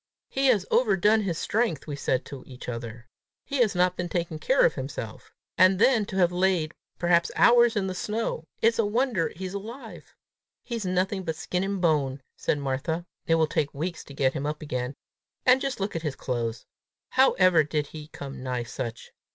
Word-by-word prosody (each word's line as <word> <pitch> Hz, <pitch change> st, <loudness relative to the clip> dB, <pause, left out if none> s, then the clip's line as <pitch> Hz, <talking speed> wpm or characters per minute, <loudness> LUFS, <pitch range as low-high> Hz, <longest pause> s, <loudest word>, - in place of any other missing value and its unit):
"He 270 Hz, 0 st, +1 dB
has 215 Hz, -7 st, +3 dB
overdone 215 Hz, -1 st, +4 dB
his 180 Hz, -6 st, -2 dB
strength!" 210 Hz, -, 0 dB
we 145 Hz, -, -4 dB
said 130 Hz, -2 st, -1 dB
to 140 Hz, -2 st, -8 dB
each 125 Hz, -2 st, -10 dB
other. 115 Hz, -1 st, -6 dB, 0.4 s
"He 280 Hz, -, -3 dB
has 230 Hz, -6 st, +3 dB
not 180 Hz, 0 st, +3 dB
been 180 Hz, -1 st, -3 dB
taking 170 Hz, -3 st, -2 dB
care 265 Hz, -, +4 dB
of 160 Hz, -, +3 dB
himself! 130 Hz, -5 st, -6 dB, 0.3 s
And 185 Hz, +1 st, +6 dB
then 220 Hz, -1 st, +4 dB
to -, -, -6 dB
have 180 Hz, -2 st, +3 dB
lain 180 Hz, -3 st, +1 dB, 0.3 s
perhaps 175 Hz, -1 st, +3 dB
hours 240 Hz, -1 st, +6 dB
in 205 Hz, -2 st, +1 dB
the 190 Hz, -, -2 dB
snow! 210 Hz, -3 st, -3 dB, 0.2 s
It's 230 Hz, +1 st, +4 dB
a -, -, +5 dB
wonder 215 Hz, -4 st, 0 dB
he's 185 Hz, +2 st, -5 dB
alive!" 225 Hz, +7 st, -8 dB, 0.5 s
"He's 230 Hz, -5 st, -4 dB
nothing 185 Hz, +2 st, 0 dB
but 160 Hz, -3 st, -3 dB
skin 180 Hz, +3 st, -2 dB
and 195 Hz, 0 st, -2 dB
bone!" 140 Hz, -6 st, +1 dB
said -, -, 0 dB
Martha. 145 Hz, +5 st, -2 dB, 0.2 s
"It 165 Hz, -, +4 dB
will 160 Hz, -1 st, +3 dB
take 150 Hz, -2 st, -1 dB
weeks 170 Hz, +3 st, -4 dB
to 140 Hz, -, -11 dB
get 135 Hz, -1 st, +2 dB
him 145 Hz, -1 st, -3 dB
up 150 Hz, +1 st, -4 dB
again! 125 Hz, -2 st, -3 dB, 0.5 s
And 255 Hz, +1 st, +6 dB
just 275 Hz, -5 st, -2 dB
look 195 Hz, -1 st, -2 dB
at 165 Hz, -, -2 dB
his 150 Hz, -4 st, -3 dB
clothes! 115 Hz, -3 st, -3 dB, 0.4 s
How 265 Hz, +1 st, +4 dB
ever 185 Hz, -4 st, +5 dB
did 150 Hz, 0 st, -1 dB
he 150 Hz, 0 st, -10 dB
come 140 Hz, -3 st, -8 dB
nigh 125 Hz, -2 st, -2 dB
such! 120 Hz, -1 st, -6 dB
175 Hz, 195 wpm, -26 LUFS, 140-200 Hz, 0.5 s, And